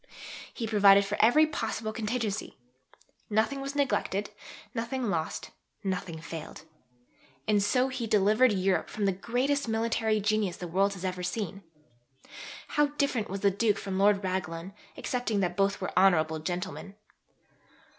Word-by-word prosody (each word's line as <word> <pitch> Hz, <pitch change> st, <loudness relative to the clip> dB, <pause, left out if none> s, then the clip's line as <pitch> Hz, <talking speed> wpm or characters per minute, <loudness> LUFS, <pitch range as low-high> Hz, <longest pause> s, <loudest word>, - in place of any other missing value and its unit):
he 230 Hz, -, -4 dB
provided 200 Hz, -2 st, +6 dB
for 200 Hz, +1 st, -2 dB
every 270 Hz, +8 st, +6 dB
possible 225 Hz, -6 st, -3 dB
contingency. 220 Hz, -2 st, -3 dB, 0.7 s
Nothing 225 Hz, +6 st, +1 dB
was 275 Hz, +1 st, -5 dB
neglected, 210 Hz, -8 st, 0 dB, 0.4 s
nothing 235 Hz, -1 st, -2 dB
lost, 160 Hz, -1 st, -3 dB, 0.3 s
nothing 180 Hz, -4 st, -3 dB
failed. 165 Hz, -1 st, -8 dB, 0.8 s
And 210 Hz, -1 st, +3 dB
so 250 Hz, +6 st, +2 dB
he 255 Hz, -3 st, -4 dB
delivered 215 Hz, +4 st, +4 dB
Europe 190 Hz, -1 st, +1 dB
from 210 Hz, -, -2 dB
the 195 Hz, -, +3 dB
greatest 250 Hz, +8 st, -1 dB
military 225 Hz, -1 st, +1 dB
genius 210 Hz, -3 st, 0 dB
the 180 Hz, -, -6 dB
world 195 Hz, +4 st, +1 dB
has 180 Hz, -1 st, -3 dB
seen. 200 Hz, -1 st, -4 dB, 1.1 s
How 295 Hz, 0 st, +3 dB
different 255 Hz, -6 st, 0 dB
was 195 Hz, +1 st, -4 dB
the 200 Hz, -, +4 dB
Duke 205 Hz, +1 st, +1 dB
from 190 Hz, -1 st, -3 dB
Lord 200 Hz, 0 st, +4 dB
Raglan, 185 Hz, -1 st, -3 dB, 0.2 s
excepting 245 Hz, -4 st, -1 dB
that 175 Hz, -1 st, -1 dB
both 200 Hz, +1 st, +1 dB
were 190 Hz, -, -4 dB
honourable 160 Hz, -4 st, +4 dB
gentlemen! 175 Hz, +2 st, -5 dB
205 Hz, 135 wpm, -29 LUFS, 190-230 Hz, 1.1 s, provided